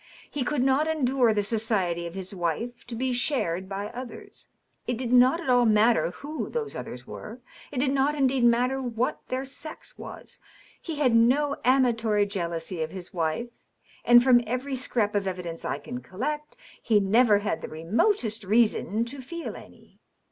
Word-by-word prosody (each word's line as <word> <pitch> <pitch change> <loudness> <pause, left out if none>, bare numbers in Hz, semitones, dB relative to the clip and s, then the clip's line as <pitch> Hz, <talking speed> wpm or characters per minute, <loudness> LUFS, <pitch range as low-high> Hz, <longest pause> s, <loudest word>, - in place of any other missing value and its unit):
He 290 - -2
could 275 0 0
not 270 +4 +3
endure 265 -6 +2
the 210 -1 +1
society 200 -6 0
of 170 - -9
his 190 0 -5
wife 190 +7 -3
to 240 - -6
be 255 +2 -1
shared 190 - -1
by 200 +1 -4
others. 245 +1 -9 0.4
It 245 - -1
did 245 0 -2
not 255 +6 +6
at 345 - -7
all 245 -2 +4
matter 215 -6 +4
who 295 - -6
those 455 -3 -4
others - - -7
were; 225 +4 -9 0.3
it 285 - -6
did 265 +1 +2
not 275 +2 +2
indeed 265 -3 +2
matter 250 +3 +3
what 245 -1 -1
their 260 +1 -2
sex 310 +3 -8
was. - - -10 0.4
He 325 - -5
had 265 -5 +2
no 275 +5 +3
amatory 230 -5 +3
jealousy 170 -3 -3
of 160 - -2
his 180 0 -9
wife 170 +8 -2 0.3
— - - -28
^and 240 0 +9
from 245 -2 +6
every 255 +4 -2
scrap 235 -5 0
of 200 -1 0
evidence 180 -3 -5
I - - -2
can 245 +1 -7
collect, 300 - -4 0.2
he 220 -3 +3
never 210 +2 +4
had 200 -5 -2
the - - -6
remotest 220 - 0
reason 220 +1 +2
to 265 +3 -8
feel 335 +6 -6
any. - - -15
240 Hz, 175 wpm, -26 LUFS, 205-265 Hz, 0.4 s, ^and